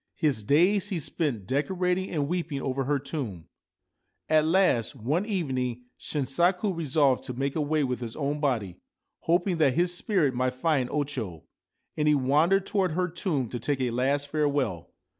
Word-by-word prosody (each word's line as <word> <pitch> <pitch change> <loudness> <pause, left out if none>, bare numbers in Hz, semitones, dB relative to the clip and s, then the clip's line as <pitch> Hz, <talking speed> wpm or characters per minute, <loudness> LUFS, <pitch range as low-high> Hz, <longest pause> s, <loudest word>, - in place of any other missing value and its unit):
His 145 -9 0
days 180 - +3
he 185 -5 -2
spent 140 - -2
decorating 180 - 0
and 145 -4 -1
weeping 165 -4 -2
over 135 0 -2
her 145 +2 +1
tomb. 130 - -5 0.8
At 155 0 +4
last 165 - +2
one 145 - -1
evening 130 - -2 0.2
Shinsaku 175 +7 0
resolved 140 -5 +2
to 125 -2 -5
make 135 +2 -2
away 155 -1 +1
with 125 -2 -2
his 115 -2 -6
own 145 0 -2
body, 115 - -1 0.4
hoping 175 +2 +1
that 140 -5 +3
his 175 +2 +2
spirit 175 -8 +1
might 125 +1 -1
find 135 -2 +1
O 150 - 0
Cho; 110 - -6 0.5
and 150 0 0
he 150 - +5
wandered 155 +9 +3
towards 190 -6 0
her 180 0 0
tomb 165 - -1
to 120 - -4
take 140 +4 -1
a 125 -2 0
last 140 +4 0
farewell. 145 - -1
145 Hz, 165 wpm, -27 LUFS, 130-170 Hz, 0.8 s, he